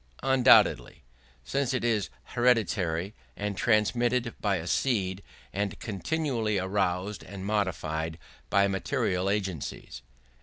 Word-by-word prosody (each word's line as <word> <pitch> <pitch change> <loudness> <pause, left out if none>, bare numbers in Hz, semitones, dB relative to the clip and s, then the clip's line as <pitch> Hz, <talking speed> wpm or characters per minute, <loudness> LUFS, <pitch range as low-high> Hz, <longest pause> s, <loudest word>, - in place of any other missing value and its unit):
Undoubtedly; 130 - +4 0.4
since 135 - -1
it 125 - -1
is 110 -6 +1 0.2
hereditary 100 -7 +1 0.2
and 105 0 -3
transmitted 120 +3 +1
by 100 -2 +1
a 85 -2 -4
seed, 95 -2 0 0.3
and 100 0 -2
continually 115 - -1
aroused 95 +1 -1
and 95 0 -8
modified 85 -6 -1 0.3
by 100 0 +4
material 95 -1 -1
agencies. 95 -7 -3
100 Hz, 105 wpm, -28 LUFS, 95-120 Hz, 0.4 s, Undoubtedly